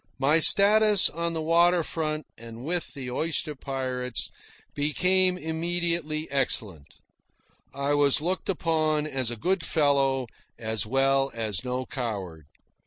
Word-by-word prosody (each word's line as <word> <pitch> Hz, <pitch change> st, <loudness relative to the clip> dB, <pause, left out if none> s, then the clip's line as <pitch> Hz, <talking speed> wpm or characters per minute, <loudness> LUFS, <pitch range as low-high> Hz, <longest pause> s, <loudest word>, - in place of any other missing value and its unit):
My 140 Hz, +5 st, +3 dB
status 205 Hz, +3 st, +5 dB
on 170 Hz, +1 st, -3 dB
the 160 Hz, -1 st, -3 dB
water 170 Hz, +1 st, +3 dB
front 155 Hz, -1 st, -3 dB
and 115 Hz, +1 st, -11 dB
with 175 Hz, +1 st, -3 dB
the 130 Hz, -3 st, -6 dB
oyster 155 Hz, +2 st, -2 dB
pirates 130 Hz, -2 st, -4 dB, 0.4 s
became 180 Hz, +5 st, +2 dB
immediately 165 Hz, -2 st, -1 dB
excellent. 105 Hz, -, -2 dB, 0.8 s
I 140 Hz, +1 st, -2 dB
was 145 Hz, -1 st, +3 dB
looked 180 Hz, +6 st, -3 dB
upon 155 Hz, -4 st, 0 dB
as 135 Hz, -5 st, -2 dB
a 120 Hz, -, -4 dB
good 180 Hz, -, -1 dB
fellow, 140 Hz, -5 st, +1 dB, 0.3 s
as 110 Hz, -2 st, -3 dB
well 135 Hz, +2 st, +2 dB
as 110 Hz, -4 st, -2 dB
no 125 Hz, 0 st, -3 dB
coward. 95 Hz, -, -6 dB
145 Hz, 125 wpm, -26 LUFS, 130-165 Hz, 0.8 s, status